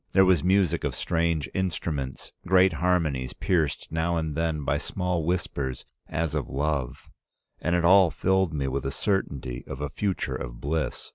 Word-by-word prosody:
There 95 0 +6
was 90 -5 +4
music 95 -2 +2
of - - -1
strange 85 -3 0
instruments, 80 -7 -3 0.2
great 95 0 +5
harmonies 80 -7 0
pierced 80 -6 0
now 80 +1 0
and 80 -2 -2
then 80 -2 -1
by - - +1
small 90 -2 -2
whispers 70 -7 -2 0.2
as 80 -1 -1
of - - -2
love, 70 -2 -2 0.5
and 85 +2 0
it 85 -1 +2
all 95 0 +7
filled 95 0 +1
me 70 -3 -2
with 70 +1 -2
a 70 - -1
certainty 70 - -2
of 65 - -6
a 75 0 -3
future 100 +5 -2
of - - -6
bliss. 75 +2 -2
80 Hz, 165 wpm, -26 LUFS, 70-90 Hz, 0.5 s, all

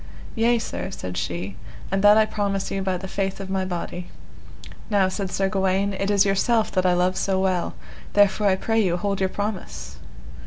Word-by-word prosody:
Yea, 235 +1 +3
sir, 220 -3 -4
said 90 - -6
she, 90 +2 -3 0.4
and 195 +1 0
that 205 +1 +8
I 220 - +5
promise 200 -2 -2
you 195 - -1
by 190 -1 0
the 190 - -7
faith 195 0 -2
of 195 -1 -6
my 190 -1 0
body. 180 -1 -4 0.8
Now, 200 -3 +3
said 190 0 -3
Sir 195 - +1
Gawaine, 195 +1 +1
it 195 +1 -2
is 200 0 +4
yourself 220 +3 +2
that 185 -1 +2
I 180 - +4
love 180 +1 +2
so 190 0 0
well, 185 -2 0 0.4
therefore 205 0 +4
I 190 - +4
pray 225 +4 0
you 180 -4 +1
hold 200 +1 -1
your 190 -1 +1
promise. 65 - -5
195 Hz, 195 wpm, -24 LUFS, 185-205 Hz, 0.8 s, that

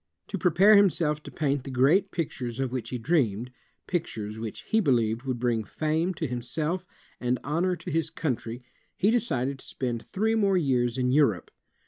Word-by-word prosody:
To 200 - -2
pre 180 - +3
pare 195 +6 +6
himself 165 -6 +2
to - - -10
paint 145 -3 -1
the - - -7
great 140 +10 +3
pictures 130 -8 -4
of 135 -2 -1
which 125 -3 -4
he 125 - -3
dreamed, 120 - 0 0.2
— - - -45
pictures 110 - -3
which 110 -1 -6
he 220 - +1
believed 120 - +2
would 130 -2 -1
biing 120 -2 0
fame 160 - -1
to 160 - -3
himself 150 +8 -3 0.3
and 125 0 0
honor 170 +6 0
to - - -7
his 160 +1 0
country, 125 -7 -3 0.3
he 200 +3 +3
decided 140 - 0
to - - -11
spend 120 -3 -4
three 220 +3 +1
more 200 -4 +3
years 125 -7 +1
in 125 -1 +1
Europe. 135 -10 +2
140 Hz, 185 wpm, -27 LUFS, 120-175 Hz, 0.3 s, pare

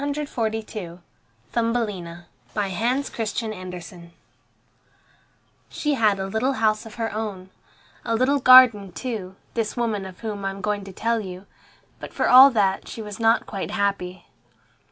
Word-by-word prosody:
THUMBELINA 210 -8 -2 0.3
BY 205 -2 0
HANS 240 +9 -1
CHRISTIAN 220 0 -3
ANDERSEN 180 -2 -9 1.6
She 295 -1 -1
had 215 -6 +2
a 190 - -2
little 220 +7 0
house 215 -2 0
of 220 - -12
her 225 -3 -3
own, 200 -4 -5 0.5
a 230 - -1
little 265 +4 +2
garden 245 -7 +7
too, 210 -7 -5 0.2
this 225 -1 -2
woman 215 -5 -1
of 185 -1 -13
whom 210 -3 -5
I 195 - 0
am 195 0 -7
going 205 -1 -2
to 195 - -9
tell 230 +4 -1
you, 185 -2 -8 0.5
but - - -9
for - - +1
all 260 +2 +9
that 200 -6 0
she 225 - -7
was 210 0 -8
not 225 +1 +3
quite 195 -1 -5
happy. 200 -4 -2
215 Hz, 145 wpm, -23 LUFS, 190-230 Hz, 1.6 s, all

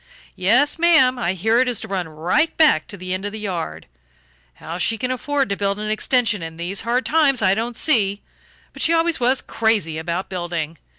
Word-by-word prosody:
Yes, 250 - +2
ma'am. 315 -7 +4
I 180 -6 0
hear 220 +6 +1
it 255 - +2
is 245 -4 0
to - - -7
run 185 -4 -3
right 175 - 0
back 300 - +4
to 200 - -6
the 185 0 -5
end 185 +1 -4
of 205 - -3
the 220 - -7
yard. 185 -6 -5 0.7
How 165 - -7
she 225 +5 +1
can 255 +2 -2
afford 280 +2 -1
to 200 - 0
build 200 0 -1
an 215 0 -3
extension 215 -2 +1
in 160 0 -7
these 175 +4 -3
hard 240 +3 -1
times 285 -7 +2
I 190 0 +4
don't 230 +3 -3
see; 205 -9 +1 0.5
but - - -7
she 330 - +3
always 330 0 +2
was 255 +2 +1
crazy 205 -9 0
about 170 +3 -3
building. 170 -3 -4
215 Hz, 210 wpm, -21 LUFS, 180-255 Hz, 0.7 s, ma'am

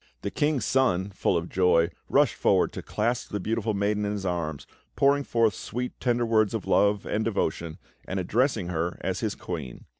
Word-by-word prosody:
The - - -2
King's 145 -3 0
Son, 100 -8 +1
full 95 -2 +1
of 85 +1 -3
joy, 90 -2 +3 0.2
rushed - - +4
forward - - +2
to - - -5
clasp 115 +3 -1
the 105 - -3
beautiful 110 +1 -1
maiden 105 +1 0
in 105 0 -1
his 100 -2 -4
arms, 85 -5 -2 0.3
pouring 140 +1 +3
forth 115 -5 +2
sweet 125 +6 -5
tender 120 -1 +1
words 110 -1 +2
of 110 - -4
love 100 0 +2
and 110 - -1
devotion, 85 -7 -2 0.3
and 95 - -2
addressing 110 0 0
her 85 0 -2
as 95 0 -2
his 110 -2 -2
queen. 75 -9 -6
105 Hz, 185 wpm, -26 LUFS, 90-115 Hz, 0.3 s, rushed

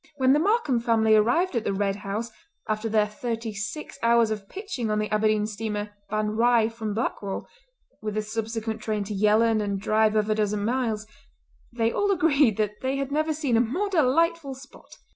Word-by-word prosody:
When 260 -1 +4
the 295 - +4
Markam 385 - +2
family 225 -2 +3
arrived 245 - +2
at 230 - 0
the 195 - -1
Red 200 0 0
House 215 +3 -4 0.4
after 215 +1 -1
their 215 -1 +3
thirty 225 +1 -4
six 220 +9 -6
hours 230 -1 +4
of 210 -2 -5
pitching 375 - -4
on 215 - +1
the 215 0 -2
Aberdeen 215 0 +2
steamer 210 -1 -4 0.2
Ban 215 0 -1
Righ 230 0 +3
from 220 -3 -4
Blackwall, 205 -3 -3 0.5
with 215 -1 -4
the 215 - 0
subsequent 225 0 -4
train 215 -2 -2
to 205 +1 -5
Yellon 215 +2 +3
and 200 -1 -2
drive 215 +1 +2
of 215 -1 +2
a 215 - +2
dozen 210 -1 -1
miles, 230 -3 -1 0.7
they 230 -1 0
all 405 +9 0
agreed 295 - +3
that 210 -1 -2
they 260 +1 -1
had 275 0 -3
never 310 +2 +1
seen 290 -6 0
a - - +5
more 345 - -1
delightful 325 -2 +1
spot. 265 +1 -15
225 Hz, 190 wpm, -25 LUFS, 215-260 Hz, 0.7 s, a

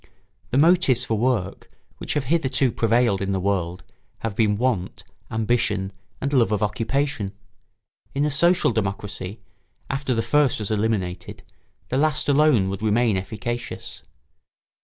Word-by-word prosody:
The 125 - 0
motives 150 -6 +4
for 110 - 0
work 110 -4 -1 0.3
which - - -3
have 145 - +1
hitherto 135 -3 +1
prevailed 115 -3 +2
in 100 0 -1
the 95 - 0
world 90 -2 -1 0.4
have 115 -3 -3
been 105 -2 +2
want, 115 -6 -1 0.3
ambition, 110 -3 0 0.3
and 140 +2 -2
love 120 -5 +3
of 105 -1 +1
occupation: 115 0 -1 0.8
in 140 +2 +2
a 150 - 0
social 170 +2 +3
democracy, 100 -1 -4 0.5
after 135 -2 -1
the 115 - 0
first 145 -1 +2
was 105 -1 -4
eliminated, 100 -5 -2 0.5
the 130 - 0
last 155 +2 +1
alone 145 -8 +4
would 100 +1 -4
remain 110 0 +2
efficacious. 120 +5 -5
115 Hz, 135 wpm, -23 LUFS, 100-135 Hz, 0.8 s, motives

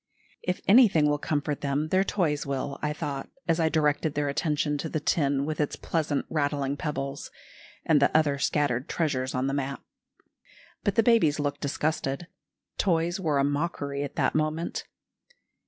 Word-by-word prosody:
If 180 - -2
anything 195 -9 +6
will 145 0 +1
comfort 145 -1 -2
them, 145 +2 -1
their 185 +2 +3
toys 165 -8 0
will, 140 0 -3
I 150 - 0
thought, 145 -3 -4 0.2
as 165 0 +2
I 160 -1 +3
directed 150 -1 +1
their 145 -1 0
attention 150 0 0
to 160 - -3
the 155 - -1
tin 140 -2 +1
with 155 0 -2
its 150 - -1
pleasant 155 -3 -1
rattling 145 -2 -1
pebbles, 140 -3 -4 0.6
and 150 -3 +4
the 140 - +5
other 145 -3 +2
scattered 140 -4 0
treasures 135 -5 -1
on 130 +1 0
the 135 - -1
mat. 140 -1 -2 1.0
But 205 - 0
the 225 - +4
babies 215 -11 +4
looked 145 -1 -2
disgusted. 145 +1 -1 0.5
Toys 175 -1 +1
were 155 -6 +1
a 140 - +3
mockery 145 -1 -1
at 145 - -5
that - - +1
moment. 155 +2 -1
150 Hz, 165 wpm, -27 LUFS, 140-160 Hz, 1.0 s, anything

